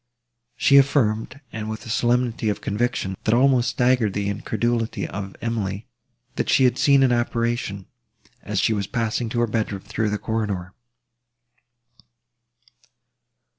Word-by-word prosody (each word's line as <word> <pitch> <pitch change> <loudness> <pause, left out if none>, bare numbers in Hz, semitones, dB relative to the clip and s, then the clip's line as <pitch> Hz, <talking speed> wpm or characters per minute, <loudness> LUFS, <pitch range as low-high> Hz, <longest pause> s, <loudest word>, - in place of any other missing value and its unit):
She 140 - +5
affirmed, 135 -2 +2
and 110 -1 -4
with 110 +3 -6
a - - -9
solemnity 120 -1 +1
of 105 - -2
conviction, 105 -3 -2
that 110 - +2
almost 130 -1 +3
staggered 125 -5 +2
the 100 +1 -1
incredulity 115 +3 -1
of 100 -1 -6
Emily, 105 -3 -2 0.5
that - - -1
she - - +4
had 125 - +3
seen 140 -3 +5
an 130 - +3
apparition, 120 -4 -1 0.6
as 105 -1 -2
she 110 - +2
was 100 -2 -2
passing 115 0 -1
to 120 +1 -1
her - - +4
bedroom, 105 -3 -2
through 110 +1 -2
the 105 - -1
corridor. 100 -5 -3
115 Hz, 135 wpm, -23 LUFS, 105-120 Hz, 0.6 s, She